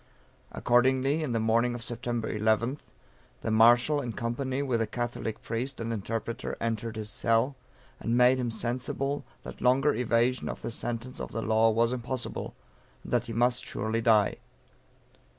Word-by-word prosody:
Accordingly, 130 +5 +2
on 145 - -2
the 115 - +1
morning 115 +2 +2
of 120 - -6
Sept. 120 +1 -3
11th, 110 +6 +1 0.6
the 110 - -2
Marshal, 120 +6 +5
in 120 -4 -4
company 130 +4 -2
with 125 -4 0
a 115 - 0
Catholic 120 -1 -4
priest 125 +4 -3
and 115 0 -2
interpreter 115 +2 -4
entered 115 0 -2
his 105 -1 -5
cell, 115 +6 +1 0.4
and 115 +1 0
made 125 +1 +5
him 120 -2 -1
sensible 125 +5 -2 0.2
that - - -9
longer 135 +4 +4
evasion 120 +2 +1
of - - -6
the - - -3
sentence 120 +2 -4
of - - -5
the 115 +1 -2
law 110 +1 +4
was 115 +2 +2
impossible, 125 0 -4 0.5
and - - -7
that 120 -1 +2
he 115 - -5
must 120 +2 +2
surely 110 +2 -2
die. 110 -3 +4
120 Hz, 160 wpm, -28 LUFS, 115-125 Hz, 0.6 s, Marshal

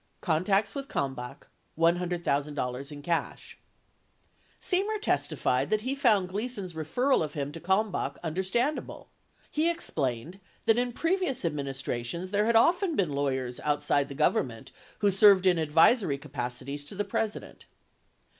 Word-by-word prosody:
CONTACTS 195 +4 +1
WITH 275 -1 -5
KALMBACH 130 - -4 0.3
$100,000 150 -6 0
IN 145 -1 -8
CASH 170 +1 -3 1.0
Semer 405 +3 0
testified 135 - 0
that 215 0 +1
he 255 +4 -2
found 225 -9 +3
Gleason's 205 -2 -4
referral 165 - +1
of 150 -2 -6
him 145 -1 -3
to 165 - -8
Kalmbach 190 +4 0
understandable; 190 - -2 0.4
he 315 +3 +2
explained 155 - -3 0.3
that 225 +1 +4
in 245 0 0
previous 330 - -1
administrations 140 +2 -3
there 210 +1 +2
had 235 - +2
often 340 - +4
been 175 -7 0
lawyers 130 -3 -2
outside 145 -1 +1
the 140 - -7
Government 130 -5 0 0.3
who 205 -1 +4
served 195 -1 +6
in 180 -3 +4
advisory 160 - +4
capacities 135 +2 -5
to 200 - -9
the 205 +1 -2
President. 220 -1 -4
175 Hz, 130 wpm, -28 LUFS, 140-220 Hz, 1.0 s, served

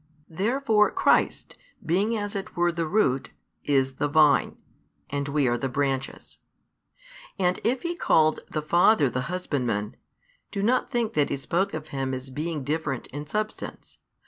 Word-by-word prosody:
Therefore 215 +4 +2
Christ, - - +1 0.3
being 200 +8 +1
as 205 -1 -4
it 195 -1 -5
were 175 0 +3
the 165 -1 -2
root, 145 -9 +1 0.3
is 135 -2 +1
the 145 - +1
Vine, 150 -1 +4 0.5
and 140 0 -2
we 140 -1 +1
are 120 0 +1
the 135 - -2
branches. 135 0 -3 1.0
And 180 -2 +1
if 245 +3 0
He 345 0 -2
called 155 - +3
the 155 - -3
Father 170 - +4
the 125 +4 -3
Husbandman, 125 - -2 0.5
do 200 -2 -3
not 250 +4 +2
think 235 -4 -1
that 145 -1 +2
He - - -1
spoke 170 +7 -1
of 155 -1 -7
Him 135 -1 -2
as 130 +1 -8
being 150 +1 -3
different 150 -2 -2
in 145 +1 -6
substance. 215 +6 -5
155 Hz, 155 wpm, -26 LUFS, 135-200 Hz, 1.0 s, Vine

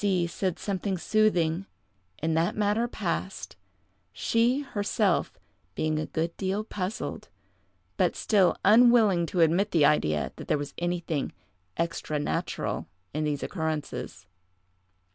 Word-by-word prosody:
C—— 185 -4 +2
said 180 +1 -2
something 195 -1 -2
soothing, 180 -3 +1 0.5
and 160 +1 -1
that 165 +2 +1
matter 215 +3 +1
passed, 190 -3 -4 0.6
she, 235 - +1
herself, 205 -6 0 0.4
being 155 -1 0
a 155 - -3
good 165 +1 -2
deal 195 +2 -1
puzzled, 205 -1 -4 0.7
but - - +2
still 200 -5 +3
unwilling 215 -5 +6
to 180 -1 0
admit 175 +6 +3
the 160 -6 +4
idea 75 - +2
that - - -8
there - - +2
was 145 -1 -5
anything 170 -4 -2 0.4
extra 165 -2 -2
natural 145 - -2 0.3
in 155 +1 -1
these 145 -2 -1
occurrences. 155 - -4
175 Hz, 125 wpm, -27 LUFS, 160-205 Hz, 0.7 s, unwilling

